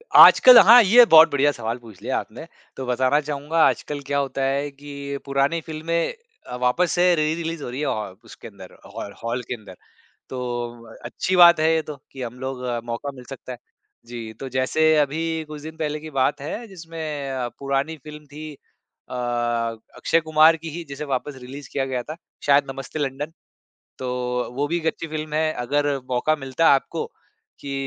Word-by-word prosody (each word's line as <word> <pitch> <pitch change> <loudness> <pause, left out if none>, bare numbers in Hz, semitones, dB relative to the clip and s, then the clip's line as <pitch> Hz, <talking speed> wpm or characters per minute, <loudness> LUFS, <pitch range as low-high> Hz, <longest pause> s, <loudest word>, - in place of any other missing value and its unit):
आजकल 255 -1 +10
हाँ, 235 +5 +9
ये 235 +5 +7
बहुत 160 -4 +8
बढ़िया 145 +1 +3
सवाल 115 -3 -4
पूछ 115 -6 -15
लिया - - -2
आपने। - - -7 0.3
तो 130 - -5
बताना 130 +3 +2
चाहूँगा, 150 +2 0
आजकल 145 -1 -3
क्या 140 - 0
होता 135 -1 -3
है 140 +2 0
कि 140 0 -7
पुरानी 140 +4 +1
फ़िल्में 160 +2 -2 0.3
अ, 125 - -6
वापस 125 +8 +1
से 180 0 +3
री-रिलीज़ 160 0 -2
हो - - -5
रही 125 +3 -6
हैं, 150 - -1
औ 105 -3 -3
उसके - - -12
अंदर, 100 -4 -13 0.2
हॉर 100 - -6
हॉल 120 +2 -2
के - - -3
अंदर। 105 -5 -13 0.5
तो 130 - -5 0.7
अच्छी 185 - -2
बात 170 -2 +8
है 160 +1 +3
ये 160 - +2
तो, 150 -1 -8 0.2
कि 135 - -9
हम 125 0 -6
लोग 130 -1 -5 0.2
मौका 120 +4 -4
मिल 125 - -11
सकता 135 -1 -9
है। 125 - -7 0.5
जी। 115 -2 -8
तो 135 - -6
जैसे 145 +5 +2
अभी 160 +2 0
कुछ 150 -1 -9
दिन 160 +1 -9
पहले 150 -1 -2
की 155 - -9
बात 135 0 0
है, 215 +11 -6
जिसमें 160 -6 -6
अ, 125 -2 -2
पुरानी 140 +3 -2
फ़िल्म 150 0 -11
थी 150 +1 -9
अ, 130 -2 -16
अक्षय 120 +3 -1
कुमार 155 +1 +5
की 165 +1 -8
ही, 170 +3 -6
जिसे 140 +2 -6
वापस 140 +1 -3
रिलीज़ 135 +3 -10
किया 135 -1 -1
गया 130 -2 -3
था, 155 - -7 0.3
शायद 140 0 +4
नमस्ते 135 +3 -7
लंडन। 145 +2 -3 0.7
तो 125 -1 -3
वो 140 +3 -1
भी 170 - 0
एक 165 -2 -4
अच्छी 165 - -2
फ़िल्म 155 0 -5
है। 155 0 +1
अगर 145 +3 0 0.2
मौका 130 +5 +1
मिलता 135 +3 +1
आपको 135 - -2 0.5
कि 140 -1 -6
145 Hz, 185 wpm, -23 LUFS, 130-155 Hz, 0.7 s, आजकल